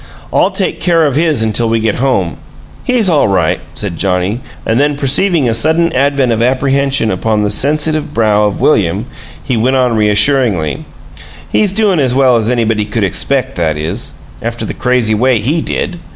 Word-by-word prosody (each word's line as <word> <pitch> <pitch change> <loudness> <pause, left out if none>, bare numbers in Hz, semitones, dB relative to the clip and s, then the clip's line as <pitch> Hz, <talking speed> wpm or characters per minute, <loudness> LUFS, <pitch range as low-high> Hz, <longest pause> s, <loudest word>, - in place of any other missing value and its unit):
"I'll - - +3
take - - -3
care 165 -3 +2
of 140 -3 0
his 155 -6 +1
until 110 +1 +1
we 115 0 +1
get 110 -1 -1
home. 120 - -1 0.5
He's 245 -5 +1
all 155 -8 +3
right," 90 -5 0 0.2
said 90 -6 -4
Johnnie, 95 +3 -1 0.3
and 115 +2 +1
then 145 +1 +1
perceiving 145 +2 +2
a 115 - +1
sudden 160 +8 +1
advent 135 -1 +1
of 115 0 0
apprehension 135 -1 +1
upon 105 +3 -1
the 105 - -1
sensitive 150 +6 0
brow 105 -2 +2
of 105 - -2
William, 100 - +1 0.4
he 130 - -2
went 125 +4 +1
on 125 -3 +1
reassuringly: 105 - +1 0.7
"He's 210 -3 +2
doin' 200 -4 +2
as 130 -3 +1
well 130 -2 +4
as 110 0 -1
anybody 115 -3 0
could 105 +1 -2
expect; 130 +6 -1
that 80 -3 0
is 80 +2 -5 0.3
after - - -4
the - - -5
crazy 125 -3 0
way 125 +3 +2
he 140 +10 -1
DID! 175 +2 -3
125 Hz, 180 wpm, -13 LUFS, 105-140 Hz, 0.7 s, well